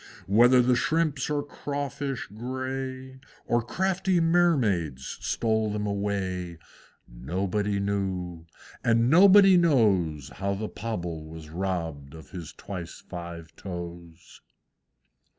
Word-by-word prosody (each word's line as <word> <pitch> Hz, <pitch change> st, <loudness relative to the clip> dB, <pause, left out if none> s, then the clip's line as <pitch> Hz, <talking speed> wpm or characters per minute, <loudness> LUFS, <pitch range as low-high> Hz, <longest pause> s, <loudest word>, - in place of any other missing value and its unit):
Whether 120 Hz, +5 st, +6 dB
the 125 Hz, +1 st, +3 dB
shrimps 150 Hz, 0 st, 0 dB
or 145 Hz, -1 st, 0 dB
crawfish 140 Hz, -2 st, -4 dB
gray, 130 Hz, +2 st, -5 dB, 0.3 s
Or 120 Hz, 0 st, +2 dB
crafty 190 Hz, +7 st, 0 dB
Mermaids 125 Hz, -, +1 dB
stole 110 Hz, -1 st, 0 dB
them 105 Hz, 0 st, -2 dB
away, 95 Hz, -4 st, -2 dB, 0.5 s
Nobody 95 Hz, -, -2 dB
knew; 95 Hz, -4 st, -3 dB, 0.4 s
and 115 Hz, +2 st, +3 dB
nobody 195 Hz, +2 st, +8 dB
knows 100 Hz, -, +2 dB
How 100 Hz, 0 st, -2 dB
the 105 Hz, +2 st, -4 dB
Pobble 85 Hz, -8 st, -4 dB
was 80 Hz, -1 st, -10 dB
robbed 80 Hz, -6 st, -3 dB
of 80 Hz, -, -13 dB
his 85 Hz, -4 st, -7 dB
twice 90 Hz, -4 st, -8 dB
five 85 Hz, -2 st, -8 dB
toes! 85 Hz, -2 st, -9 dB
100 Hz, 105 wpm, -27 LUFS, 85-130 Hz, 0.5 s, nobody